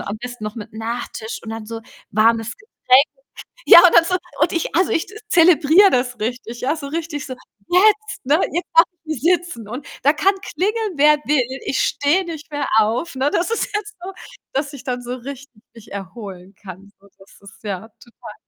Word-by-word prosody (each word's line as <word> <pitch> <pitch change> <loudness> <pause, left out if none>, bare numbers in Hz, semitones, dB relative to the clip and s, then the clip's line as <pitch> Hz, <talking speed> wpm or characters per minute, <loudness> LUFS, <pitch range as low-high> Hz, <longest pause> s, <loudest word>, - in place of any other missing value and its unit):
am 200 - -5
besten 245 0 -9
noch 210 0 -5
mit 215 - -8
Nachtisch 225 0 -5
und 225 - -8
dann 225 -1 -7
so 225 0 -7 0.3
warmes 225 +2 +2
Getränk.“ 280 - +3 0.6
Ja, - - +10
und 350 - +2
dann 335 - +7
so 365 +2 0 0.2
und 315 +2 +3
ich 335 - -2
also, 365 +2 +2
ich 325 - 0 0.2
zelebriere 340 +3 +5
das 245 -1 0
richtig, 240 +1 -5
ja, 275 +4 +1
so 295 -3 -7
richtig 315 -2 -4
so: 255 - -6 0.3
„Jetzt, 425 0 +2
ne, 300 +6 +3
jetzt 345 +1 -2
kann 330 - +8 0.2
ich 310 -5 -4
sitzen 345 - 0
und 250 +5 -7 0.2
da 285 - +5
kann 385 +6 +2 0.2
klingeln, 425 +1 -1
wer 300 +2 +6
will, 265 -2 0
ich 265 - -1
stehe 320 +7 +1
nicht 320 -2 -8
mehr 290 -2 -2
auf, 230 +10 0
ne? 265 +2 0
Das 350 +5 0
ist 460 - -1
jetzt 420 0 -4
so, 380 +2 -6 0.4
dass 280 +1 -2
ich 280 - -10
dann 250 -1 -3
so 245 +1 -5
richtig 255 -2 -10
mich 230 -1 -15
erholen 195 -1 -9
kann.“ 195 0 -11
So, 200 - -22
das 195 - -19
ist, 200 - -16
ja, 205 0 -5
total. 235 - -13
270 Hz, 195 wpm, -20 LUFS, 225-335 Hz, 0.6 s, Ja